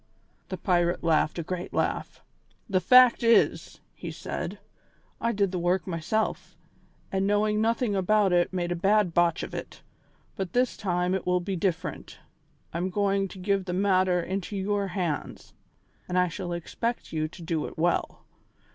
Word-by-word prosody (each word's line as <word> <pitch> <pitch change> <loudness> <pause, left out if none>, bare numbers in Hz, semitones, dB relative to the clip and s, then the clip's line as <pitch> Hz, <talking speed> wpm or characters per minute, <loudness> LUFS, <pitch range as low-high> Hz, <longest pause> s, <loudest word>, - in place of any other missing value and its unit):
The - - -4
pirate 175 -2 +1
laughed 160 -1 +2
a 170 - -2
great 180 +2 -5
laugh. - - -2 0.4
"The 195 -4 +2
fact 250 +4 +6
is," 230 -1 +2
he - - -7
said, - - -5 0.6
"I 230 - +1
did 200 -4 +1
the 185 - -2
work 175 0 +1
myself, 185 +5 -2 0.5
and 195 0 0
knowing 210 +1 +2
nothing 230 -1 +1
about 195 0 +3
it 175 0 +3
made 175 -2 -2
a - - +1
bad 195 0 +2
botch 170 -1 +2
of - - -7
it, - - -7 0.5
but 190 -3 -4
this 250 0 +2
time 180 -2 0
it 190 - -2
will 180 0 +3
be 190 +2 -3
different. 180 -1 -3 0.6
I 170 - -2
am 185 +2 -1
going 195 0 +1
to 190 - -12
give 195 0 0
the 180 - -3
matter 185 -1 +2
into 190 +3 -3
your 200 +1 0
hands, 175 -5 -4 0.6
and 180 - 0
I 180 -1 +3
shall 180 0 -5
expect 230 +8 -3
you 155 -1 0
to 170 +3 -13
do 160 -2 -2
it - - -11
well. 170 +2 0
185 Hz, 170 wpm, -27 LUFS, 175-205 Hz, 0.6 s, fact